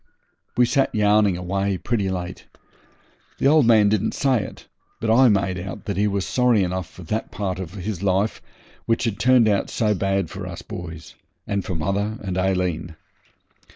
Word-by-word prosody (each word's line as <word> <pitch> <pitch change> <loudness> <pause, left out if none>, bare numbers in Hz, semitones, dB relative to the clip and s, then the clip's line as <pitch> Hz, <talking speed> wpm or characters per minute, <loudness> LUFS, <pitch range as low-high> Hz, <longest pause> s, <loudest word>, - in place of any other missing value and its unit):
We 125 - +6
sat 135 +1 +1
yarning 105 -3 +3
away 95 +2 -1
pretty 100 -1 -1
late. 90 -1 -5 0.9
The - - -2
old 145 -3 +5
man 110 -3 +6
didn't 105 -1 0
say 130 -5 +2
it, - - -10 0.3
but 110 - 0
I 125 +2 +6
made 100 -3 +1
out 95 +4 -7
that 100 - -2
he 105 +2 +2
was 100 -2 -1
sorry 125 -5 +3
enough 90 -1 -3
for 95 - -12
that 110 +7 -3
part 95 -3 -3
of 90 -1 -7
his 95 -1 -4
life 100 +2 0 0.5
which 115 0 +1
had 115 -4 -2
turned 125 -2 +5
out 100 -2 +1
so 105 -2 +1
bad 95 -1 0
for 95 -1 -6
us 90 -2 -8
boys, 80 -3 -8 0.3
and 100 -2 -1
for 90 - -4
mother 100 +6 -1
and 95 -2 -3
Aileen. 90 -3 -1
100 Hz, 180 wpm, -23 LUFS, 90-110 Hz, 0.9 s, We